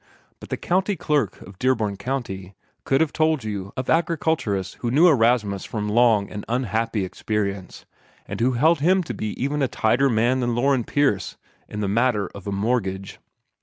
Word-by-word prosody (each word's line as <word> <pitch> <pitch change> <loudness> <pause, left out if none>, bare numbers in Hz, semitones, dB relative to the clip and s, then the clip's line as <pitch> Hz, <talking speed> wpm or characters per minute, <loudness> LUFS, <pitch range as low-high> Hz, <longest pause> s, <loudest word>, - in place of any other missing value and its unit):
But - - -12
the - - -2
County 190 +3 0
Clerk 145 - 0
of 95 -1 -14
Dearborn 115 -6 +1
County 100 -8 -4 0.3
could 135 - +2
have 160 -2 +1
told 155 -4 +1
you 100 -3 -5
of 130 - -3
agriculturists 160 - 0
who 120 - -2
knew 150 +9 +5
Erastus 115 - +2
from 105 -2 -4
long 110 -2 +3
and 105 - -6
unhappy 115 -3 -1
experience, 100 -1 -4 0.4
and - - -5
who 125 +2 +3
held 155 +7 +3
him 185 +5 +3
to 165 - -5
be 110 -1 -5
even 145 +3 -1
a 135 - +3
tighter 120 +4 +2
man 120 +3 +2
than 120 -2 0
Loren 130 -1 +2
Pierce 135 -10 0 0.3
in 105 - -5
the 100 - 0
matter 110 0 +1
of 100 0 -10
a - - -2
mortgage. 100 -2 -2
120 Hz, 175 wpm, -23 LUFS, 100-135 Hz, 0.4 s, knew